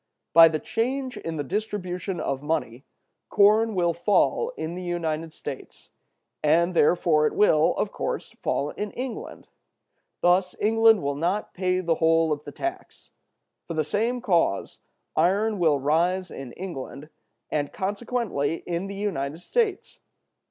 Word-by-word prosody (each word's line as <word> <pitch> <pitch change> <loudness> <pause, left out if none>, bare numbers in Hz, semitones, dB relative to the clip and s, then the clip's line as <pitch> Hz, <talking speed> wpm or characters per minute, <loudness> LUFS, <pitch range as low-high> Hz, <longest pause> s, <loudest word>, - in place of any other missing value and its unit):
By 165 +1 +10
the 155 -1 0
change 255 - -2
in 165 -5 -5
the 145 - -2
distribution 185 0 -3
of 135 0 -2
money, 145 -5 -3 0.4
corn 215 +2 +4
will 175 -2 +2
fall 210 - +1
in 165 - -4
the 180 - -6
United 165 -2 -3
States, - - -9 0.5
and 170 +4 +3
therefore 155 -2 +3
it - - -4
will, 160 -7 +4
of - - -1
course, - - -4
fall 145 - -1
in 210 - -4
England. 255 -1 -6 0.7
Thus 180 +1 +3
England 225 -1 +4
will 140 0 0
not 175 +8 -2
pay 185 0 0
the 170 -2 +1
whole 165 0 +3
of 145 0 -7
the - - -7
tax. 345 +2 -6 0.6
From 165 - -5
the 155 - +2
same 230 +10 -1
cause, 170 - 0 0.4
iron 200 +6 +2
will 160 -4 +3
rise 170 +6 +1
in 135 -3 -8
England, 155 -5 -7 0.4
and 145 -2 -1
consequently 200 - -2
in 175 +2 -3
the 200 - -6
United 165 -7 -3
States. 425 - -1
175 Hz, 145 wpm, -25 LUFS, 155-210 Hz, 0.7 s, By